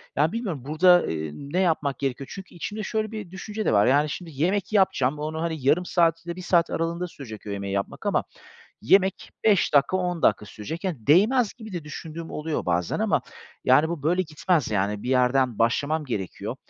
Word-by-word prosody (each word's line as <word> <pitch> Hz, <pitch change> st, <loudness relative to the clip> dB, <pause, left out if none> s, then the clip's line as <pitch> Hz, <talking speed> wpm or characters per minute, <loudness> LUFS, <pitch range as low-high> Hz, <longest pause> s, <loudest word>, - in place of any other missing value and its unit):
Yani, 150 Hz, +3 st, +2 dB
bilmiyorum 200 Hz, -, -3 dB
burada, 175 Hz, +4 st, +5 dB
ııı, 80 Hz, -, -3 dB, 0.2 s
ne 185 Hz, -, +2 dB
yapmak 150 Hz, -7 st, +1 dB
gerekiyor? 135 Hz, 0 st, -3 dB
Çünkü 190 Hz, -2 st, -10 dB
içimde 210 Hz, +5 st, -5 dB
şöyle 215 Hz, +1 st, -2 dB
bir 210 Hz, -5 st, -7 dB
düşünce 210 Hz, +3 st, -5 dB
de -, -, +2 dB
var; 100 Hz, 0 st, +5 dB
yani, 145 Hz, +3 st, +3 dB
şimdi 170 Hz, +1 st, -6 dB
yemek 185 Hz, +9 st, 0 dB
yapacağım, 150 Hz, -8 st, +2 dB
onu 155 Hz, +1 st, -3 dB
hani, 165 Hz, -1 st, -1 dB
yarım 165 Hz, +6 st, +3 dB
saat 165 Hz, -1 st, +1 dB
ile 170 Hz, 0 st, -4 dB
1 185 Hz, -, -8 dB
saat 175 Hz, -2 st, +2 dB
aralığında 170 Hz, +2 st, -2 dB
sürecek 115 Hz, -9 st, -10 dB
o -, -, -5 dB
yemeği 100 Hz, -1 st, -4 dB
yapmak 100 Hz, 0 st, -3 dB
ama -, -, +1 dB, 0.6 s
yemek 190 Hz, -, +2 dB
5 200 Hz, -8 st, +3 dB
dakika, 145 Hz, +6 st, +4 dB
10 180 Hz, -2 st, -2 dB
dakika 105 Hz, 0 st, +3 dB
sürecek. 160 Hz, -, -7 dB
Yani, 150 Hz, -, -4 dB
değmez 210 Hz, -, +4 dB
gibi 220 Hz, -4 st, -10 dB
de 170 Hz, -4 st, -5 dB
düşündüğüm 160 Hz, +2 st, -7 dB
oluyor 150 Hz, -, -3 dB
bazen. 90 Hz, -1 st, 0 dB
Ama -, -, +2 dB, 0.4 s
yani 145 Hz, +5 st, +5 dB
bu 170 Hz, -4 st, -4 dB
böyle 180 Hz, +4 st, +2 dB
gitmez 155 Hz, -3 st, 0 dB
yani, 105 Hz, 0 st, -1 dB
bir -, -, -5 dB
yerden 125 Hz, -2 st, +2 dB
başlamam 145 Hz, +7 st, +1 dB
gerekiyor. 100 Hz, -8 st, -4 dB
160 Hz, 195 wpm, -25 LUFS, 130-185 Hz, 0.6 s, burada